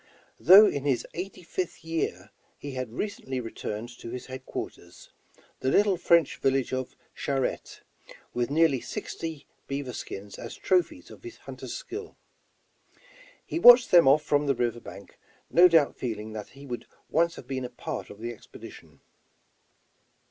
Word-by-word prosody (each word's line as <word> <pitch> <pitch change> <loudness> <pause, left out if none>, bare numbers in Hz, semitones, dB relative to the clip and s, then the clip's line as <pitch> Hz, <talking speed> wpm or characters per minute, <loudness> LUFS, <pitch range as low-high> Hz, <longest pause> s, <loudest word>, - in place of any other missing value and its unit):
Though 195 +5 +9
in 145 -8 -1
his 135 -4 +1
eighty 185 +1 -6
fifth 170 -1 -5
year, 105 - -3 0.3
he 145 - -7
had 130 -3 -5
re 125 - -1
cently 135 -11 -5
returned 115 -1 -5
to - - -8
his 125 +1 -6
headquarters, 130 0 -8 0.5
the 130 - 0
little 200 +6 +4
French 170 -3 +3
village 135 -1 0
of 130 0 -3 0.2
Charette, 135 -2 -3 0.5
with 120 0 -1
nearly 150 -4 +3
sixty 160 -4 -6 0.2
beaver 140 -2 -4
skins 100 +1 -7
as - - -7
trophies 185 - 0
of - - -13
his 355 -1 -10
hunter's - - -8
skill. 425 +1 -7 1.3
He 335 - -3
watched 245 -4 +9
them 170 -5 +7
off 145 +3 +5
from 145 -1 +1
the 140 - +2
river 120 -1 -1
bank, 100 -3 -12 0.3
no 175 +1 +8
doubt 165 -5 +3
feeling 110 -3 -5
that 105 -2 -7
he 140 - -11
would 125 -3 -6 0.2
once 170 +2 +2
have - - -10
been 130 0 -4
a 125 - -4
part 120 - -6
of - - -11
the 120 +1 -4
expedition. 110 - -14
140 Hz, 155 wpm, -27 LUFS, 120-170 Hz, 1.3 s, Though